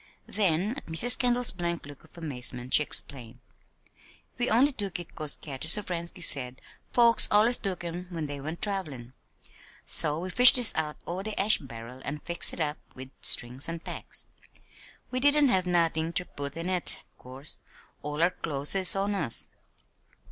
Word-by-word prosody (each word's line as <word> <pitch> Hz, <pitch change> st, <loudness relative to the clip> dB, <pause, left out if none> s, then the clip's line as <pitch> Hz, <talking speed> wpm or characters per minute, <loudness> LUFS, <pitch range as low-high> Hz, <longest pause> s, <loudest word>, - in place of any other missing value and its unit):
Then, 195 Hz, -1 st, 0 dB
at 275 Hz, -, -8 dB
Mrs. 195 Hz, +10 st, +2 dB
Kendall's 245 Hz, -1 st, +1 dB
blank 170 Hz, -3 st, -5 dB
look 145 Hz, -1 st, -14 dB
of -, -, -22 dB
amazement, 125 Hz, -5 st, -2 dB
she -, -, +7 dB
explained: 125 Hz, -5 st, -2 dB, 1.0 s
"We 245 Hz, -, 0 dB
only 260 Hz, +6 st, +3 dB
took 200 Hz, -8 st, -2 dB
it 175 Hz, -, -11 dB
'cause 155 Hz, -3 st, 0 dB
Katy 140 Hz, +1 st, -7 dB
Sovrensky 175 Hz, -1 st, +2 dB
said 130 Hz, -4 st, +3 dB, 0.3 s
folks 235 Hz, -1 st, +5 dB
allers 220 Hz, +4 st, +3 dB
took 190 Hz, -4 st, -6 dB
'em 175 Hz, +1 st, -7 dB
when 165 Hz, -4 st, -6 dB
they 145 Hz, -1 st, -7 dB
went 155 Hz, +4 st, -8 dB
trav'lin'. 150 Hz, -, -4 dB, 0.7 s
So 150 Hz, +1 st, +1 dB
we 185 Hz, +1 st, -6 dB
fished 250 Hz, +5 st, +9 dB
dis 245 Hz, -3 st, +4 dB
out 150 Hz, -1 st, -4 dB
o' 180 Hz, +2 st, -5 dB
de 215 Hz, +1 st, -4 dB
ash 210 Hz, +3 st, +3 dB
barrel 125 Hz, -1 st, -12 dB
an' 145 Hz, -, -5 dB
fixed 170 Hz, +3 st, -3 dB
it -, -, -9 dB
up 150 Hz, -1 st, -2 dB, 0.2 s
wid 130 Hz, +1 st, -9 dB
strings 125 Hz, +5 st, +4 dB
an' 165 Hz, 0 st, -5 dB
tacks. -, -, -7 dB, 0.9 s
We 255 Hz, -, -2 dB
didn't 285 Hz, +1 st, +3 dB
have 185 Hz, -4 st, +2 dB
nothin' 165 Hz, -2 st, -1 dB
ter 180 Hz, -, -3 dB
put 140 Hz, -1 st, -9 dB
in 165 Hz, +1 st, -6 dB
it, 185 Hz, -2 st, +2 dB, 0.2 s
'course. 130 Hz, +3 st, -7 dB, 0.4 s
All 150 Hz, +2 st, -3 dB
our 175 Hz, -, +2 dB
clo's 145 Hz, -5 st, -3 dB
is 190 Hz, -1 st, +3 dB
on 200 Hz, +1 st, -2 dB
us." 190 Hz, -, +1 dB
170 Hz, 170 wpm, -26 LUFS, 145-195 Hz, 1.0 s, fished